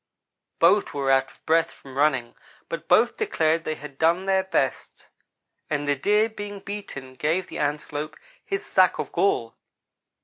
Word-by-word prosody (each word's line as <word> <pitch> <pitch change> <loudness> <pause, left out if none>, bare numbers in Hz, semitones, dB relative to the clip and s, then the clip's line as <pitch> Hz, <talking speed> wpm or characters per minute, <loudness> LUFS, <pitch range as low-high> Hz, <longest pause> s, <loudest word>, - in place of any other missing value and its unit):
"Both 185 0 +3
were 135 -1 +1
out 135 0 +3
of - - -25
breath 165 +1 +3
from 135 -1 -14
running, 135 -4 +1 0.4
but - - -5
both - - +4
declared 165 - +1
they 155 - -2
had 145 -3 -11
done 170 +4 +3
their 190 0 +3
best, 190 - -2 0.6
and 145 -2 -1
the 145 - +3
Deer, 210 +10 +3
being 205 -2 -7
beaten, 195 -11 -7
gave 160 +7 0
the - - -6
Antelope 150 +1 -3 0.3
his 390 -1 -3
sack 185 -1 +3
of - - -4
gall. 115 -12 +1
160 Hz, 160 wpm, -25 LUFS, 145-195 Hz, 0.6 s, both